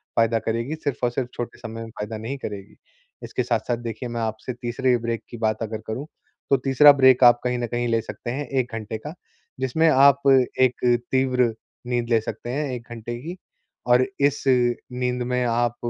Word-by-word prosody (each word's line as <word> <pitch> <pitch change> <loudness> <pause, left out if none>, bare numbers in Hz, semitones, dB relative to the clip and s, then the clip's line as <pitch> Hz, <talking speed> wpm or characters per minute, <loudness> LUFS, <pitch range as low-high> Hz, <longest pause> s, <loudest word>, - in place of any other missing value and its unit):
फ़ायदा 115 0 +3
करेगी, 115 +7 -2
सिर्फ़ 145 -4 -4
और 120 - +2
सिर्फ़ 125 0 -3
छोटे 120 - -6
समय 115 0 -7
में 115 - -9
फ़ायदा 105 0 -6
नहीं 115 +6 -5
करेगी। 100 -6 -8 0.5
इसके - - -2
साथ-साथ 120 - -1
देखिए, 120 +1 -6
मैं 115 -1 -3
आपसे 110 +3 -4
तीसरे 125 +1 0
ब्रेक 115 -1 -3
की 120 - -8
बात 110 0 -1
अगर 110 0 -4
करूँ, 120 +6 -4 0.4
तो 140 - +5
तीसरा 135 +3 +6
ब्रेक 130 -2 +5
आप 120 0 +7
कहीं 125 0 0
न 120 - -2
कहीं 120 +1 -2
ले 115 0 +2
सकते 120 - -7
हैं 140 +3 -4
1 130 -3 -1
घंटे 110 0 -5
का, 150 +8 -8 0.5
जिसमें 160 +5 +2
आप 140 0 +5 0.4
एक 125 -1 +2 0.3
तीव्र 125 -3 +2 0.3
नींद 120 -1 -1
ले 115 -2 +3
सकते 120 - -6
हैं 140 +1 -2
1 120 -1 -7
घंटे 120 0 -6
की 175 +5 -7 0.5
और 125 +1 +5
इस 140 0 +1
नींद 125 0 0
में 125 0 0
आप 120 0 +1
120 Hz, 195 wpm, -23 LUFS, 115-130 Hz, 0.5 s, आप